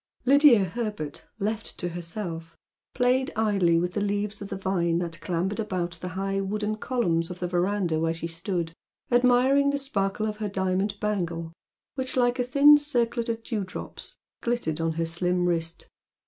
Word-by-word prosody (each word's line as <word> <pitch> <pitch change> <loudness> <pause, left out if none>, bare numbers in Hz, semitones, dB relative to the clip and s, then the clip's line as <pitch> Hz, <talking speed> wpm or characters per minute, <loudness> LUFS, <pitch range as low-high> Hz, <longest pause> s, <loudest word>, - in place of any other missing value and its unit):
Lydia 275 -5 +7
Herbert, 205 -7 -4
left 215 +2 -2
to 175 - -3
herself, 170 -1 -6 0.4
played 255 +1 +2
idly 200 -6 +3
with 175 +1 0
the 205 - -1
leaves 205 0 -2
of 200 - -6
the - - -3
vine 175 -3 0
that 170 -1 -4
clambered 185 +4 -1
about 175 -5 -2
the 180 - -4
high 195 0 -1
wooden 210 +2 -2
columns 175 -10 0
of 180 - -6
the 180 - -2
verandah 180 -2 0
where 165 0 +1
she 165 - -5
stood, 170 0 -3 0.4
admiring 250 +3 +4
the 285 - +1
sparkle 215 -6 -1
of 210 -1 -3
her 210 -1 -3
diamond 190 +1 -1
bangle 170 -6 -2 0.4
which, 260 -1 -3
like 245 0 +2
a - - +3
thin 285 +4 +7
circlet 240 -5 0
of 230 0 -2
dewdrops, 205 -5 -5 0.2
glittered 235 -10 -1
on 165 0 0
her 165 +1 -1
slim 180 +2 +1
wrist. 165 -1 -2
195 Hz, 165 wpm, -26 LUFS, 170-230 Hz, 0.4 s, Lydia